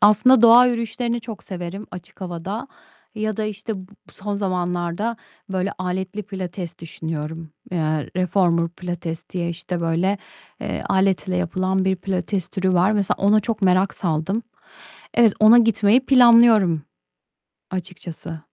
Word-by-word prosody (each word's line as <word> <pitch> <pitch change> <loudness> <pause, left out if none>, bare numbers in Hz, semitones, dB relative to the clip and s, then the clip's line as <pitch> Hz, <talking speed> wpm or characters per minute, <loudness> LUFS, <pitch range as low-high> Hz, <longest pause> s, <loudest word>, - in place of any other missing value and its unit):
aslında 215 +4 +6
doğa 235 +2 +8
yürüyüşlerini 235 0 -2
çok 225 -2 -9
severim 185 +2 -6
açık 180 +3 -12
havada 190 +8 -5 0.5
ya 215 -1 -2
da, 220 - -2
işte, 215 +1 -4
bu 185 - -10 0.3
son 205 +1 -5
zamanlarda, 180 +2 -2 0.4
böyle, 190 +1 -1
aletli 185 +3 -3
pilates 185 -3 -6
düşünüyorum. 160 0 -6 0.2
Eee, 180 - -2 0.4
reformer 175 -2 +2
pilates 175 -2 -6
diye, 175 -2 -2
işte, 175 +1 -5
böyle, 175 +4 0 0.4
eee, - - -4
aletle 190 -1 +1
yapılan 185 +1 0
bir 190 0 +1
pilates 185 0 -3
türü 190 -1 -1
var. 180 +3 +3
Mesela 205 -3 +1
ona 210 +2 +4
çok 220 -1 -4
merak 185 +1 +3
saldım. 175 +6 -1 0.7
Evet, 230 -4 +5
ona 215 +2 +8
gitmeyi 225 +2 +3
planlıyorum 230 - +6 0.9
açıkçası. 175 -2 -7
190 Hz, 130 wpm, -22 LUFS, 175-215 Hz, 0.9 s, doğa